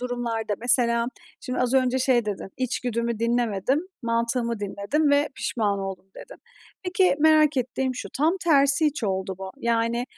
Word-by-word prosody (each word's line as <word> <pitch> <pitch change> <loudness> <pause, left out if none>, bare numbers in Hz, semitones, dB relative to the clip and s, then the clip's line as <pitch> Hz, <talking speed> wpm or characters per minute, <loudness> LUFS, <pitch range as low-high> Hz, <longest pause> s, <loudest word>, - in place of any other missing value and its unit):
durumlarda 235 -3 -2
mesela, 235 -1 +2 0.3
şimdi, 255 - -4
az 250 +1 +1
önce 260 0 +2
şey 255 -2 +2
dedin, 205 -2 -4
"İçgüdümü 235 -2 -2
dinlemedim, 235 +2 +1 0.2
mantığımı 235 0 -1
dinledim 205 +10 0
ve 285 +1 +3
pişman 205 -4 -1
oldum." 190 -1 -6
dedin. - - -12 0.4
Peki, 365 -4 +2
merak 310 -1 +5
ettiğim 255 +1 -1
şu, 250 - -6
tam 320 +5 +3
tersi 285 -1 +4
hiç 295 -5 -2
oldu 190 -1 -2
mu? 190 0 -6
Yani, 235 +1 0
240 Hz, 145 wpm, -25 LUFS, 230-275 Hz, 0.4 s, merak